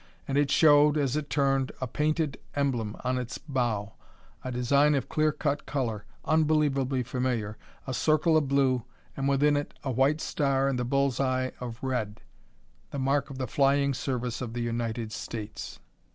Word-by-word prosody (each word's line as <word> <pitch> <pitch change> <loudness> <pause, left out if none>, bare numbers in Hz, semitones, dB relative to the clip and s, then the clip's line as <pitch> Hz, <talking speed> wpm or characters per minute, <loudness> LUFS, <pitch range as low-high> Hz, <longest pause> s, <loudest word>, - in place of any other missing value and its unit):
And 135 - -2
it 145 -1 +3
showed, 150 0 +5
as 140 -2 +1
it 150 -1 -3
turned, 135 -2 +1
a 130 - -2
painted 150 +2 -1 0.2
emblem 120 -7 -1
on 125 0 0
its 125 +1 -5
bow, 120 -7 -2 0.5
a 130 - -4
design 140 +4 +3
of 135 - -1
clear 155 0 +2
cut 145 0 -2
color, 120 -7 -2 0.2
unbelievably 145 -4 +2
familiar 120 -4 -2 0.3
a 130 - -3
circle 155 +4 +3
of 155 -3 +3
blue, 130 -3 +2 0.3
and 135 0 0
within 145 +2 +3
it 145 0 -3
a 135 - -1
white 135 +5 +2
star 135 -4 +1
and 135 -2 0
a - - 0
bull's 135 0 +1
eye 130 -1 0
of 120 -2 -6
red 110 -5 -2 0.7
the - - -6
mark 140 +1 +1
of 135 - -8
the 130 - -2
flying 140 +2 +2
service 125 -1 -3
of 120 -3 -4
the 120 - -3
United 115 -1 -2
States! 110 -1 -6
135 Hz, 170 wpm, -28 LUFS, 125-145 Hz, 0.7 s, showed